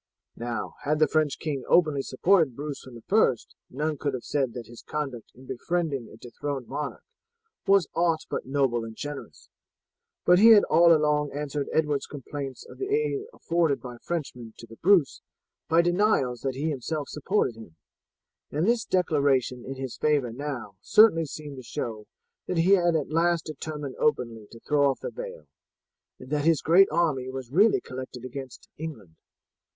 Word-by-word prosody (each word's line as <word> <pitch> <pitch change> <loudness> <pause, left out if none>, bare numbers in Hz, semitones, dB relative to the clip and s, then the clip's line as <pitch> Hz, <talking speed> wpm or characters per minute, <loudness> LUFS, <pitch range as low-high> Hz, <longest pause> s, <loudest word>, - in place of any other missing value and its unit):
Now, 120 -2 -4
had 150 +2 0
the 155 - +4
French 155 -3 +1
king 145 -5 -3
openly 155 -5 +4
supported 155 0 +2
Bruce 145 +1 -5
from 130 -2 -12
the 115 - -12
first, 190 - +2 0.2
none 150 +2 -2
could 140 -3 -1
have 125 - -6
said 135 -5 -1
that 120 -2 -6
his 120 +2 -12
conduct 135 -7 -5
in 130 +2 -15
befriending 140 -1 -2
a - - -14
dethroned 130 +2 -5
monarch 145 +1 -5 0.6
was 195 -5 +5
aught 165 -2 +1
but - - -4
noble 135 -4 +1
and 115 -1 -8
generous; 145 +2 -8 0.8
but 180 +1 +6
he 225 +2 +9
had 210 - +7
all 170 0 +5
along 150 -2 +3
answered 145 0 -3
Edward's 150 -3 0
complaints 140 -1 -7
of - - -13
the 390 - -2
aid 425 -1 0
afforded 165 - 0
by 125 -2 -9
Frenchmen 125 -9 -5
to - - -10
the 115 0 -14
Bruce 175 -6 +3 0.5
by 165 +1 +5
denials 175 - +2
that 135 -1 -2
he 155 +4 -1
himself 145 +2 -3
supported 150 - 0
him; 110 -8 -13 0.7
and 155 +4 -1
this 230 0 +2
declaration 140 -8 +1
in 135 +2 -6
his 130 -2 -6
favour 145 -6 +1
now 120 -6 -6
certainly 205 - +5
seemed 145 -1 -8
to - - -7
show 110 -3 -5 0.4
that 180 - -2
he 170 +4 +3
had 175 -4 +4
at 150 -2 -1
last 170 +1 +2
determined 150 -2 -6
openly 115 - 0
to 115 - -13
throw 145 -2 +3
off 135 - -3
the - - -4
veil, - - -8 0.7
and 130 - -13
that 150 -1 +1
his 165 -3 +3
great 185 +5 +6
army 150 -6 0
was 130 -2 -7
really 205 +9 +5
collected 130 -1 -8
against 130 0 -8
England. 115 - -7
145 Hz, 175 wpm, -26 LUFS, 130-165 Hz, 0.8 s, he